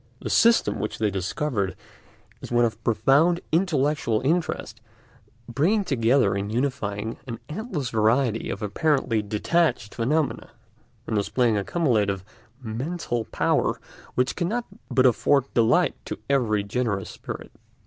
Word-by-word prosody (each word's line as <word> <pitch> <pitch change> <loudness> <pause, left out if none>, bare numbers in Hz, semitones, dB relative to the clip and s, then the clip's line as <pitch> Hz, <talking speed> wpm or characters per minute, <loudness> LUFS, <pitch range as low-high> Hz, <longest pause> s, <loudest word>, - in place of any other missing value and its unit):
The - - -4
system 230 0 +4
which 105 - -3
they 105 -1 0
discovered 100 - -2 0.7
is - - -9
one 120 0 +4
of 115 0 -4
profound 135 +10 +3
intellectual 150 - +1
interest, 140 -6 -1 0.7
bringing 170 - +1
together 130 -4 +2
and 100 +1 -3
unifying 115 -4 -2
an 115 -2 -5
endless 155 - -4
variety 115 +1 +2
of 100 - -4
apparently 120 +1 +1
detached 105 +2 0
phenomena, 145 +6 -1 0.6
and - - -2
displaying 115 +3 +1
a 100 - 0
cumulative 105 - +1 0.4
mental 120 +1 -3
power - - 0 0.4
which 125 +1 +1
cannot 220 +7 -1 0.2
but 130 0 +3
afford 130 +2 +3
delight 125 +10 +3
to - - -5
every 115 -7 +1
generous 100 -2 -2
spirit. - - -8
125 Hz, 125 wpm, -25 LUFS, 110-150 Hz, 0.7 s, system